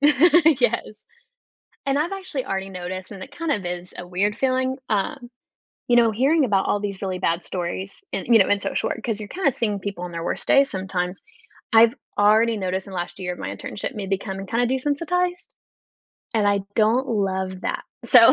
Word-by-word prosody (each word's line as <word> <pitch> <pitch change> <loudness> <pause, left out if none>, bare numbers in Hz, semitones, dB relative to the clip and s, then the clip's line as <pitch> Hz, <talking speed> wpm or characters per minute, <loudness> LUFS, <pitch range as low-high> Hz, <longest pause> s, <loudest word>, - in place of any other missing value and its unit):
yes. 290 -7 +4 0.8
And 275 +1 +1
I've 330 +5 0
actually 370 -9 -4
already 195 -4 -3
noticed, 185 +1 -6
and 195 -2 -7
it - - -13
kind 330 -2 -1
of 205 -8 0
is 175 0 -5
a 175 - -7
weird 200 +4 0
feeling, 260 0 +1
um, 240 +5 -1 0.6
you 240 - +4
know, 235 -1 +6
hearing 270 +7 +3
about 195 -4 +2
all 205 - +1
these 200 -2 -4
really 185 -1 -2
bad 170 0 0
stories 190 - -4
and, - - -3
you 230 -2 +6
know, 195 - +4
in 205 - +3
social - - -1
work, - - -4
'cause 225 -3 -2
you're 210 -1 -7
kinda 350 -7 +1
seeing 210 -5 -1
people 190 -2 -5
on 180 - -5
their 165 -1 -5
worst - - -3
days 275 0 +5
sometimes, 185 -1 -3 0.5
I've 225 0 +7 0.2
already 220 +2 +4
noticed 190 -1 -2
in - - -9
the 185 - -5
last 175 0 -5
year 180 -1 -3
of - - -12
my - - -4
internship - - -5
me 205 -4 -5
becoming 195 0 -3
kinda 235 +4 +1
desensitize, 335 +8 -1 0.8
and 215 -3 +2
I 200 0 +2
don't 230 +5 +3
love 190 -3 -1
that. - - -3 0.2
So 235 0 +8
210 Hz, 195 wpm, -23 LUFS, 190-260 Hz, 0.8 s, So